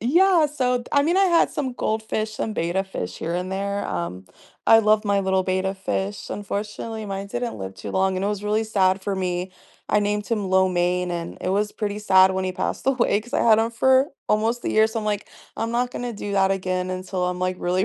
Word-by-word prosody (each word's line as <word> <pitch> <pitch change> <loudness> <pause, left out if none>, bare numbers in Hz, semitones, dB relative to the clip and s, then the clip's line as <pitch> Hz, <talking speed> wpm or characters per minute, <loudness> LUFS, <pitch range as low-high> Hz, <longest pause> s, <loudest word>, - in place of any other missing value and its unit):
Yeah, 340 - +4
so, 255 -4 0
d 240 - -9
I 285 - +4
mean, 340 +5 +1
I 390 - +5
had 340 -2 +3
some 265 -4 -3
goldfish 220 -1 -2
and 215 - -2
betta 175 +4 0
fish 90 - -5
here 170 +1 -3
and 180 +1 -3
there, 200 +1 -2
um, 90 +1 -4 0.4
I 225 0 +8
love 215 0 +3
my 200 -1 +2
little 190 -1 +1
betta 190 +1 0
fish. 195 +1 -3
Unfortunately, 210 +2 -5
mine 195 0 -5
didn't 240 +2 -3
live 95 -1 -6
too - - -7
long, 190 0 +1
and 190 - -1
it - - +1
was 205 -1 -3
really 215 +1 +1
sad 195 -3 +2
for 195 +1 -2
me. 180 0 -2 0.4
I 210 - +3
named 205 0 -1
him 210 -5 -1
Lo 190 0 +4
Mein, 180 0 0
and 170 -1 -5
it - - -2
was 205 +2 +1
pretty 210 -1 -3
sad 190 -2 +5
when 190 0 -1
he 185 - -1
passed - - -3
away 240 -6 +2
'cause 240 +5 -15
I - - +1
had 225 -2 +6
him 225 +1 0
for 265 +4 +3 0.2
almost 225 +3 +1
a - - 0
year, 220 0 +5
so 225 0 -3
I'm 215 - -4
like, 210 -1 -2 0.3
"I'm 230 0 -2
not 245 +1 0
gonna 245 -1 -4
do 205 -1 -5
that 195 -1 +3
again 185 -1 -1
until 185 0 -3
I'm, 180 0 -2
like, 185 0 -1
really 185 +2 +1
200 Hz, 235 wpm, -23 LUFS, 185-225 Hz, 0.4 s, I